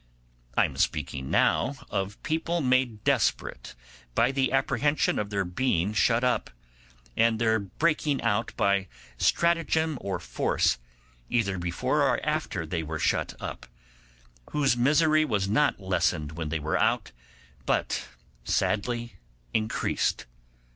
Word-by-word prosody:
I - - +6
am - - -6
speaking 70 -3 -1
now 140 - +2 0.2
of 100 +1 -3
people 165 +2 -1
made 130 -6 +1
desperate - - 0 0.4
by 125 - +3
the 135 -1 +1
apprehensions 140 +2 +1
of 105 - -2
their 100 -2 -1
being 90 0 0
shut 115 +2 +3
up, 125 -1 +1 0.7
and 115 0 +3
their 110 -1 +2
breaking 145 - 0
out 105 +2 +1
by 100 -1 +2 0.3
stratagem 160 -3 +2
or 95 -3 -3
force, - - 0 0.5
either 100 -6 0
before 85 0 0
or - - +3
after 80 - -1
they 80 +1 -2
were 80 0 -4
shut - - 0
up, - - -7 0.9
whose 140 -4 +3
misery 155 +5 +4
was 100 -9 0
not 130 +7 +2
lessened 90 -5 0
when 80 -1 -4
they 80 - -1
were 75 +1 -1
out, - - +1 0.6
but - - 0 0.4
sadly 115 - -1 0.3
increased. 110 0 0
110 Hz, 125 wpm, -27 LUFS, 95-135 Hz, 0.9 s, I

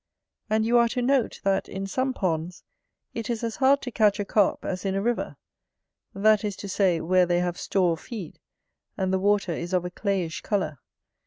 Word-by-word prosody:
And 220 +1 +2
you 240 +1 +4
are 235 - +4
to 250 +2 -2
note, 260 -2 +1
that, 195 -1 +1
in 195 +1 -4
some 260 +7 -1
ponds, 175 -6 -2 0.5
it 230 -1 -5
is 235 0 -2
as 230 -1 -3
hard 275 +1 +4
to 250 - -4
catch 215 -3 +3
a 205 - -1
Carp 205 -1 +1
as 185 -1 -3
in 195 -1 -1
a 195 - 0
river; 240 +1 -1 0.8
that 215 +1 +4
is 205 -2 -2
to 200 - -8
say, 185 -3 +2
where 180 +2 +3
they 175 0 +2
have 175 -1 -2
store 180 -3 +1
of 165 - -6
feed, 205 -10 -8 0.6
and 190 0 0
the 190 - +2
water 200 -1 +2
is 170 +2 -4
of 180 -1 +1
a 180 - -4
clayish 185 -4 -2
colour. 155 - -2
195 Hz, 210 wpm, -26 LUFS, 180-220 Hz, 0.8 s, you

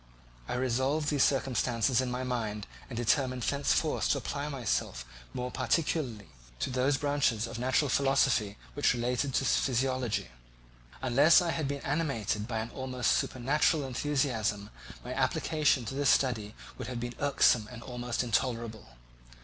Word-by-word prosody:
I - - -3
revolved 130 +4 0
these 145 -2 +1
circumstances 125 -3 +1
in 130 - -2
my 125 +1 -3
mind 110 -5 -3 0.2
and 120 - -6
determined 125 +1 +1
thenceforth 145 +3 +1
to - - +3
apply 140 +2 -4
myself 115 - -2 0.3
more 125 0 -4
particularly 135 -11 -1 0.3
to 60 - -2
those 130 +2 +2
branches 140 -6 +1
of 115 - -6
natural 130 +4 +2
philosophy 135 -6 +2 0.2
which 145 -3 +2
relate 120 +1 -1
to 135 -1 0
physiology. 130 - 0 0.7
Unless 140 +7 +6
I 175 -2 0
had 155 -3 -2
been 140 0 -3
animated 135 -9 -1
by 115 -3 -2
an 115 +2 -6
almost 130 -2 -1
supernatural 145 +4 +1
enthusiasm, 120 -7 -1 0.3
my - - -4
application 150 -5 +1
to 115 - -5
this 140 0 +1
study 110 -5 +1 0.2
would - - -5
have 125 -2 -4
been 120 0 -4
irksome 130 -6 +3
and 115 -2 -9
almost 125 -1 -3
intolerable. 115 - -2
125 Hz, 145 wpm, -30 LUFS, 115-140 Hz, 0.7 s, Unless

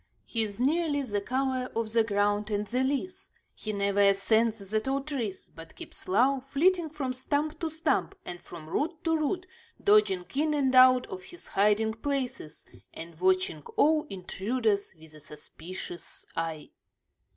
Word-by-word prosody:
He 230 - -1
is 210 -1 -1
nearly 290 +1 +1
the 205 -5 -2
color 255 +2 -1
of 225 -1 -2
the 230 -1 +5
ground 205 0 +1
and 205 0 -1
the 250 +5 0
leaves; 285 +7 -3 0.2
he 215 - -5
never 200 0 +1
ascends 200 +1 +2
the 215 - +3
tall 270 +4 -1
trees, 255 -10 -4
but 165 0 -12
keeps - - -8
low, 255 +8 +3
flitting 320 +6 +2
from 285 -4 -3
stump 295 +4 -1
to 325 - -1
stump 300 - 0
and 175 0 -7
from 160 -3 -10
root 315 - -2
to 325 -1 +2
root, 350 +4 -1 0.4
dodging 200 -3 +4
in 300 +2 +1
and 270 -3 +1
out 255 0 +7
of 185 -1 -8
his 350 - -10
hiding 210 +2 +3
places, 250 - -4 0.3
and 165 0 -9
watching 185 -4 +2 0.2
all 305 +1 +4
intruders 200 +2 -1
with 160 -1 -14
a 155 - -13
suspicious 165 +4 -7
eye. 165 -2 -4
225 Hz, 160 wpm, -29 LUFS, 195-275 Hz, 0.4 s, out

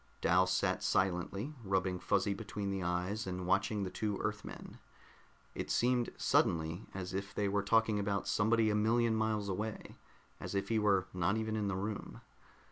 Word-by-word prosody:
Dal 90 +2 +4
sat 95 - +1
silently, 95 - 0
rubbing 95 -2 0
Fuzzy 100 +2 +1
between 100 -1 -4
the 95 -1 -2
eyes 90 +4 -1
and 90 0 -3
watching 100 +3 +1
the 95 - -4
two 105 0 -2
Earthmen. 105 0 -5 0.7
It - - -4
seemed 125 0 +2
suddenly 80 +3 +1
as 90 -1 -5
if 100 +1 -4
they 105 - +1
were 100 +1 +1
talking 110 +1 +3
about 100 0 -1
somebody 110 +1 +3
a - - +1
million 115 +2 +3
miles 110 -2 0
away, 105 +3 -4 0.4
as - - -5
if 100 0 -1
he 115 -1 +2
were 100 -3 +3
not 90 +4 +1
even 110 0 -2
in 105 -2 0
the 95 - -1
room. 100 +2 -5
100 Hz, 170 wpm, -34 LUFS, 95-110 Hz, 0.7 s, Dal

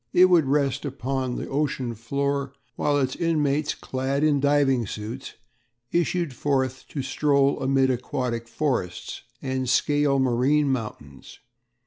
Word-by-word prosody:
It 185 +1 +6
would 170 -4 +5
rest 140 -1 +1
upon 130 -2 -2
the - - -4
ocean 135 -4 -1
floor 140 +4 -2 0.2
while 145 -1 +1
its 130 -2 0
inmates, 150 -3 0
clad 135 +2 -2
in 150 -2 +3
diving 135 -4 +2
suits, 110 +7 -6 0.6
issued 170 -2 0
forth 130 -1 -1
to 140 - -4
stroll 140 0 +2
amid 135 0 +3
aquatic 120 -1 -3
forests 130 - -2 0.2
and 130 -2 -2
scale 145 +2 +2
marine 135 +3 +2
mountains. 105 - -6
135 Hz, 125 wpm, -25 LUFS, 130-145 Hz, 0.6 s, It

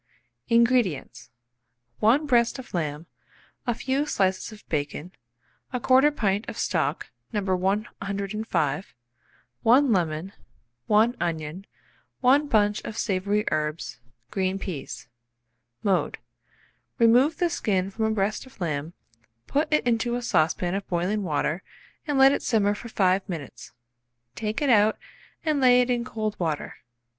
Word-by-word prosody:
INGREDIENTS. 230 - +1 0.7
1 250 +8 +4
breast 240 -3 +3
of 260 - -10
lamb, 155 -2 -2 0.6
a 240 - +1
few 270 +5 -1
slices 190 -4 0
of 215 -1 -14
bacon, 150 +3 -3 0.6
1/4 265 +4 +4
pint 205 -2 0
of - - -7
stock - - -1 0.2
No. 215 - 0 0.2
105, 195 -3 -2 0.7
1 255 +3 +5
lemon, 170 +1 -1 0.5
1 220 +3 +4
onion, 165 +2 -3 0.5
1 275 +4 +4
bunch 210 -4 +2
of 215 - -7
savoury 205 +1 0
herbs, 155 -2 -2 0.3
green 190 0 0
peas. 155 -9 -6 0.8
Mode. 195 -3 +1 0.8
Remove 245 +6 +4
the 350 -1 +1
skin 195 - 0
from 220 +2 -1
a - - +1
breast 215 +3 -1
of 260 - -19
lamb, 155 -2 -3 0.5
put 295 +3 0
it 305 - +2
into 240 0 +1
a 245 - -3
saucepan 175 -3 +1
of 195 0 -3
boiling 180 +4 0
water, 155 0 -1 0.5
and 290 -2 0
let 270 0 +7
it - - 0
simmer 205 -4 +2
for 235 +3 -8
5 190 -1 +1
minutes. 160 -7 -7 0.6
Take 215 - -3
it 285 - +2
out 215 -1 +4 0.5
and 305 -2 +1
lay 250 -1 +6
it 250 0 +2
in 240 -1 0
cold 215 -3 -4
water. 160 -4 -3
210 Hz, 130 wpm, -25 LUFS, 180-240 Hz, 0.8 s, let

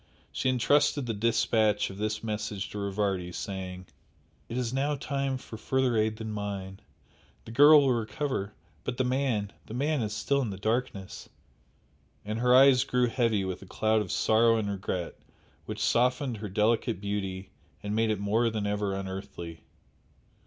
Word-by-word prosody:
She 130 - 0
entrusted 140 +2 +2
the 115 - -2
dispatch 110 -1 +2
of 95 - -10
this 110 +1 -2
message 105 -2 -3
to 105 - -5
Rivardi, 100 -3 -1
saying 95 -1 -6 0.6
"It 115 - -4
is 125 -1 -1
now 140 +2 0
time 140 -1 -2
for 115 -3 -10
further 130 +2 +1
aid 110 0 +1
than 110 0 -6
mine. 100 -2 -5 0.7
The - - -9
girl 145 +5 +8
will 135 -2 +3
recover 115 -2 -3 0.3
but 125 - -4
the 130 - +2
man 125 -6 0
the 110 - -7
man 145 +2 0
is 105 -2 -2
still 130 +7 +1
in 120 - -2
the 95 - -5
darkness!" 110 -2 -3 1.0
And 110 +2 -3
her 125 +1 +4
eyes 135 -1 +7
grew 125 -2 +1
heavy 115 -5 +1
with 95 -1 -4
a 95 - -12
cloud 110 +3 +1
of - - -4
sorrow 115 +1 +4
and 105 -2 -1
regret 95 -3 -4 0.5
which - - -4
softened 125 0 +1
her 105 0 -6
delicate 105 -1 +1
beauty 95 -2 -4 0.3
and 105 +1 -2
made 110 0 +2
it 105 -2 0
more 110 +4 +2
than 110 -2 -3
ever 100 -1 -1
unearthly. 95 -4 -7
110 Hz, 165 wpm, -28 LUFS, 100-125 Hz, 1.0 s, girl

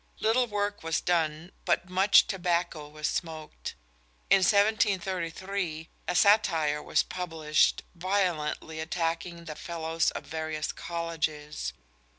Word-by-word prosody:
Little 240 +3 +3
work 205 -1 -2
was 165 -1 0
done, 165 0 0
but 180 +1 +1
much 190 +2 +5
tobacco 175 -5 -1
was 155 0 -3
smoked. 155 - -4 0.6
In 195 - +9
1733 190 -4 +1 0.2
a 180 - 0
satire 165 -8 +4
was - - +2
published, 160 -4 +1
violently 170 -4 -1
attacking 170 +1 -2
the 155 - -5
Fellows 165 0 -1
of - - -6
various 155 -1 -3
colleges. 160 -3 -3
170 Hz, 110 wpm, -29 LUFS, 160-190 Hz, 0.6 s, In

